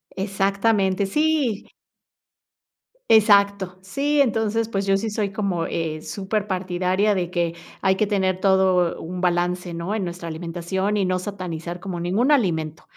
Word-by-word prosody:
Exactamente, 195 0 +1
sí. 295 -2 0 1.4
Exacto, 200 -3 +4
sí, 280 +10 0
entonces, 225 -3 +1
pues, 195 -3 -2
yo 195 0 +3
sí 220 +3 -2
soy 210 -2 -2
como, 195 -5 -1
eh, 160 -2 -3
superpartidaria 190 0 -1
de 175 -2 -2
que 170 -2 0 0.3
hay 190 -1 +3
que 215 - +1
tener 190 -2 0
todo 190 -3 +3
un 180 +2 -6
balance, 180 0 0
¿no? 170 +5 -3
En 215 - -1
nuestra 175 -1 -6
alimentación, 175 +5 -2
y 200 - +1
no 185 0 +1
satanizar 180 -3 -5
como 180 -2 -5
ningún 205 - +1
alimento, 160 - 0
190 Hz, 140 wpm, -23 LUFS, 180-205 Hz, 1.4 s, Exacto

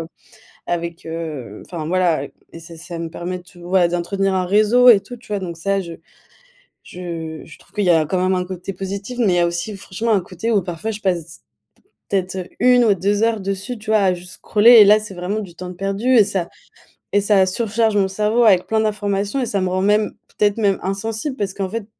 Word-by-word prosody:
Heu, 165 - -6 0.6
avec 170 0 -4
heu 155 -10 -6
enfin, 160 -3 -6
voilà. 175 -5 +1
Et - - -14 0.2
et 165 - -10
ça 165 0 -12
ça, 170 +1 -8
me 170 - -3
permet 180 +2 -5
de, 175 0 -17
voilà, 175 0 +2
d'entretenir 190 +3 -1
un 185 -1 0
réseau 215 +6 +5
et 215 -5 +8
tout, 200 +5 -10
tu 235 - -18
vois? 205 -1 -2
Donc 175 -3 -5
ça, 195 +4 -1
je 170 -3 -6 0.9
je, 180 - -11
heu, 165 -3 -6
je 155 - -14
trouve - - -24
qu'il 210 - -1
y 180 - +3
a 160 -3 +4
quand 180 +3 -1
même 185 0 +2
un 180 - -1
côté 185 +1 -6
positif. 200 +6 -6
Mais 215 -6 +3
il - - +2
y - - +2
a 170 - +3
aussi 175 +5 -4
franchement 200 +4 -3
un 200 - +3
côté 185 +6 -4
où 205 -4 +2
parfois 175 +6 -4
je 215 - -7
passe 175 -4 -2 0.7
peut-être 185 -2 -2
1 250 0 +5
ou 210 -3 +4
2 200 +3 0
heures 225 -1 +1
dessus, 195 +5 -4
tu 215 0 -7
vois, 215 -1 +4
à 190 -2 +3
juste 180 +1 -10
scroller. 220 +2 +4
Et - - +10
là, 210 +1 +6
c'est 210 -2 -8
vraiment 180 +4 -3
du 190 -5 -7
temps 180 +1 -8
de 180 - -8
perdu 195 +5 -2
et 215 - +7
ça 185 -3 -2 0.7
et 205 - +4
ça 200 -2 +4
surcharge 220 +2 0
mon 195 -2 +2
cerveau 215 +4 +1
avec 190 -5 +4
plein 220 0 +1
d'informations 205 +1 -1
et 255 - 0
ça 200 -4 -1
me 185 - 0
rend 185 +1 -1
même, 210 +2 +2 0.3
peut-être, 205 0 +2
même, 200 -3 +1
insensible 220 +8 -3
parce 195 -2 -2
qu'en 195 -1 -3
fait, 220 0 -4
195 Hz, 235 wpm, -20 LUFS, 175-210 Hz, 0.9 s, Et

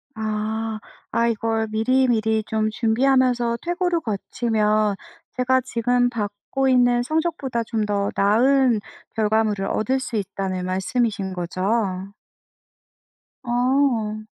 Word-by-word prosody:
아. 220 0 -3 0.3
아 230 0 +2
이걸 225 0 0
미리미리 220 -1 +2
좀 215 0 0
준비하면서 245 +1 +2
퇴고를 350 0 0
거치면 215 -2 0 0.4
제가 260 +1 +2
지금 245 0 +1
받고 220 +4 -3
있는 245 -1 +4
성적보다 310 -5 -1
좀 220 -1 -2
더 200 -1 0
나은 240 +4 +3 0.4
결과물을 215 -2 +1
얻을 255 +7 0
수 240 -2 -5
있다는 190 -2 -3
말씀이신거죠? 190 -1 -1 1.3
어. 245 -3 +1
225 Hz, 220 characters per minute, -22 LUFS, 210-250 Hz, 1.3 s, 있는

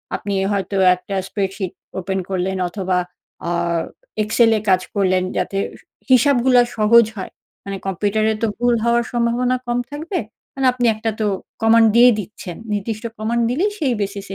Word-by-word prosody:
আপনি 200 - -4 0.2
হয়তো 200 0 -2 0.2
একটা 190 +2 -7
স্প্রেডশিট 195 -2 -3 0.3
ওপেন 190 +1 -2
করলেন, 190 0 -1
অথবা, 185 0 -1 0.5
আ - - 0 0.7
এক্সেলে 225 +1 +3
এ 215 - -15
কাজ 185 -1 +4
করলেন, 185 -2 +2
যাতে 195 - -1
হিস - - -14 0.3
হিসাবগুলা 255 -1 +5 0.2
সহজ 225 +2 +6
হয়। 190 - -6 0.3
মানে 200 0 -5
কম্পিউটারে 210 +3 +1
তো 230 - +2
ভুল 245 0 +2
হওয়ার 235 0 +3
সম্ভাবনা 240 +1 +1
কম 240 0 0
থাকবে। 320 +6 -3 0.4
মানে 270 -1 -1
আপনি 250 -1 -1
একটা 220 +1 -2
তো 215 - 0 0.4
কমান্ড 225 0 +6
দিয়ে 240 +1 +8
দিচ্ছেন। 190 -3 -8 0.2
নির্দিষ্ট 210 +1 -3
কমান্ড 235 +2 0
দিলেই, 345 - 0
সেই 275 -6 +1
বেসিস 200 0 -4
220 Hz, 155 wpm, -20 LUFS, 195-240 Hz, 0.7 s, দিয়ে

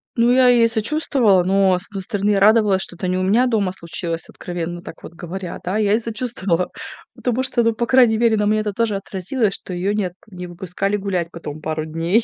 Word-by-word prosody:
Ну, 235 0 +3
я 255 0 +5
ей 235 -2 +5
сочувствовала, 225 - +2
но, 190 -1 +3
с 195 - -5
одной 195 -2 -6
стороны, 205 +1 0
радовалась, 205 -1 +4
что 175 - -6
это 185 - -3
не 185 0 0
у 185 - 0
меня 215 +7 +3
дома 210 -6 +1
случилось, 170 -2 -5
откровенно 175 0 -5
так 160 - -11
вот - - -10
говоря, 175 +1 -6
да. 185 +4 -1
Я 210 -2 +2
ей 225 - +2
сочувствовала, 215 -6 -2 0.5
потому 250 +1 -1
что, 240 -2 0
ну, 230 0 +2
по 235 +2 -1
крайней 240 -3 +4
мере, 230 -1 +3
на 210 -1 +1
мне 215 +1 +2
это 210 -1 -2
тоже 225 0 0
отразилось, 195 +3 -2
что - - -8
ее 190 +4 -1
нет 190 -4 -2
не 180 -3 -8
выпускали 190 +3 -3
гулять 185 -4 -2
потом 155 -2 -8
пару 155 0 -3
дней. 165 +8 +1
200 Hz, 215 wpm, -20 LUFS, 180-225 Hz, 0.5 s, я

